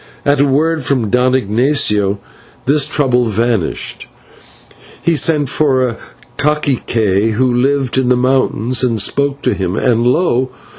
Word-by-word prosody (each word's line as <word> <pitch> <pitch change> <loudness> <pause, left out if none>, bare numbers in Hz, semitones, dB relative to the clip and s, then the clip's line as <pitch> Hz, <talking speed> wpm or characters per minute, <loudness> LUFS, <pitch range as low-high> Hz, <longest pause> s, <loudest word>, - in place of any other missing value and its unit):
At 145 -1 +2
a 140 - +3
word 155 +3 0
from 125 -6 -1
Don 125 +1 +2
Ignatio 105 -4 +1 0.5
this 145 +1 +2
trouble 130 -5 +1
vanished. 115 -3 -2 0.9
He 170 - 0
sent 150 0 +1
for 130 -4 +1
a 115 -1 -5 0.4
/cacique/, 115 -8 0
who 125 +2 +1
lived 130 +1 0
in 125 -1 0
the 125 - +3
mountains, 130 -1 0
and 115 -3 0
spoke 140 +7 -1
to - - +1
him, 95 -1 -3
and 120 -1 +1
lo! 130 -3 +1
130 Hz, 140 wpm, -15 LUFS, 115-140 Hz, 0.9 s, a